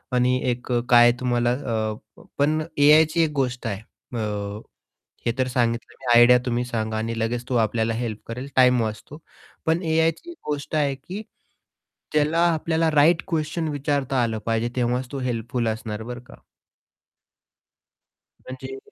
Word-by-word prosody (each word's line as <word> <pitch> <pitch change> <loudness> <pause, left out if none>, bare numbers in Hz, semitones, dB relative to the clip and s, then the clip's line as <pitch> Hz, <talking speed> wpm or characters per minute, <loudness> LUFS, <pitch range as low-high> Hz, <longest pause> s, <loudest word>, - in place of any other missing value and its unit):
आणि 125 +1 +3
एक 125 +1 -5
अ, 120 - +3
काय 120 0 +7
तुम्हाला 120 -1 +1
अ, 110 -4 -4
पण 155 +2 +2 0.2
एआयची 155 +3 +5
एक 155 - 0
गोष्ट 130 -3 -1
आहे 100 -3 -3 0.4
अ, 105 -1 -3 0.7
हे 115 - +2
तर 130 - +2
सांगितलं 120 -1 -1
मी 120 -2 +4
आयडिया 125 +1 +7
तुम्ही 120 0 0
सांगा 110 -2 -3
आणि 115 +1 -3
लगेच 120 +2 -2
तो 130 - -2
आपल्याला 110 +1 -1
हेल्प 115 -2 -4
करेल, 125 +4 -6
टाईम 125 -2 +5
वाचतो. 110 +7 -5 0.5
पण 165 +3 +2
एआयची 160 - 0
एक 345 - -11
गोष्ट 145 +1 -4
आहे, 145 -3 +1
की 180 +10 -8 0.9
त्याला 155 +2 +2
आपल्याला 160 +1 0
राइट 155 +3 +4
क्वेशन 160 -1 -2
विचारता 140 -3 -1
आलं 115 -1 -1
पाहिजे 115 +1 0
तेव्हाच 125 +1 0
तो 140 - -4
हेल्पफुल 120 -1 -2
असणार, 110 -1 -4
बरं 120 +1 -7
का? - - -13 2.1
म्हणजे 130 +1 -7
125 Hz, 150 wpm, -23 LUFS, 115-145 Hz, 2.1 s, काय